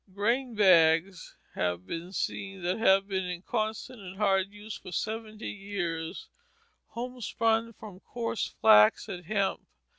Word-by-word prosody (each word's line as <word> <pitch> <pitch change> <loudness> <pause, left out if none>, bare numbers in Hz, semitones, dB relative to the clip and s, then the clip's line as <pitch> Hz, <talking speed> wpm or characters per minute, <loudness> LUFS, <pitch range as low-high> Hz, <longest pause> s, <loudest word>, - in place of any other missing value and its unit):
Grain 235 +4 0
bags 170 -2 +4 0.2
have 90 0 -2
been 165 - -6
seen 195 0 -4
that 180 +4 -1
have 195 -3 +4
been 190 -2 -2
in 180 0 -5
constant 220 +3 -3
and 190 0 -9
hard 195 -2 +2
use 210 +1 -9
for - - -10
seventy 215 +3 -4
years, 175 -5 -4 0.6
homespun 230 -2 -1
from 205 -4 -11
coarse 230 +1 -3
flax 105 - +5
and 180 -4 -7
hemp. 200 -1 0
195 Hz, 130 wpm, -29 LUFS, 180-220 Hz, 0.6 s, flax